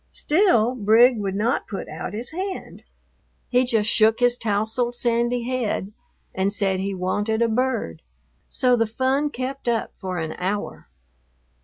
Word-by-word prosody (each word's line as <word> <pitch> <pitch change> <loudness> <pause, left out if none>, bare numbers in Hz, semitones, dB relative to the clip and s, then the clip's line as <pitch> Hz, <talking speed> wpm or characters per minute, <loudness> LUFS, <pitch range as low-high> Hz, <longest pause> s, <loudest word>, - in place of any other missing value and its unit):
Still 295 - +2
Brig 230 +1 +4
would 195 -2 -2
not 220 +5 0
put 200 - -6
out 190 - -6
his 235 +7 -4
hand. 375 +3 -6 0.7
He 250 0 +3
just 225 -4 +1
shook 220 +1 +3
his 245 0 +3
tousled 225 +2 -1
sandy 240 0 +1
head 235 -5 -2 0.4
and 190 +1 0
said 195 -2 0
he 195 +1 -2
wanted 205 +5 0
a - - +3
bird. 230 - -1 0.5
So 250 -1 +3
the 230 -2 +1
fun 265 +6 0
kept 265 0 -5
up 235 -2 0
for 185 -3 -4
an 160 -2 -3
hour. 195 +3 -3
230 Hz, 150 wpm, -23 LUFS, 205-250 Hz, 0.7 s, Brig